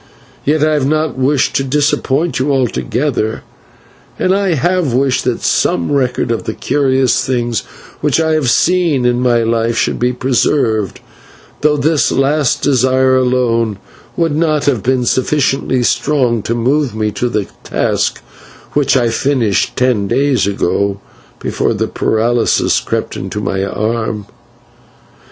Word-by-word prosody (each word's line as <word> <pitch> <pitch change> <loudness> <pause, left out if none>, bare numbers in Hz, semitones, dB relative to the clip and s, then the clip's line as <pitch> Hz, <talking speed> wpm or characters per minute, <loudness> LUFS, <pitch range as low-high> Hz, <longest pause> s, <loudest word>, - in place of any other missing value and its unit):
Yet 150 +1 +2
I 155 0 +2
have 145 -3 +1
not 155 -2 0
wished 130 +1 +1
to 135 - 0
disappoint 145 +2 0
you 140 +3 0
altogether, 125 -2 -1 0.7
and 185 - +1
I 195 -3 +1
have 175 -1 0
wished 135 0 +1
that - - -1
some 85 -1 +1
record 130 -4 0
of 115 - -2
the 110 - -4
curious 130 -3 +1
things 120 -3 -1 0.4
which 150 0 +1
I 160 -1 +1
have 155 -5 +1
seen 165 -3 +2
in 120 0 +2
my 120 -2 +2
life 115 0 0
should - - 0
be 125 +1 +1
preserved, 120 -4 0 0.6
though 150 0 +2
this 150 +1 +1
last 140 0 +1
desire 130 -1 +3
alone 120 -4 +1 0.4
would 165 -3 +1
not 155 -2 +1
have 130 -7 +1
been 125 +2 0
sufficiently 130 -1 +1
strong 125 -3 +1
to 115 - +1
move 130 +1 0
me 110 -1 -1
to 120 +3 -2
the 105 -4 -1 0.2
task - - -1 0.5
which 140 -2 +2
I 120 -2 +2
finished 115 -4 0
ten 125 -6 +1
days 130 +1 +1
ago, 100 0 -1 0.4
before - - -1
the - - -1
paralysis 115 +1 +1
crept - - -3
into 95 +2 -5
my 95 -1 -2
arm. 110 +1 -2
130 Hz, 140 wpm, -15 LUFS, 115-145 Hz, 0.7 s, desire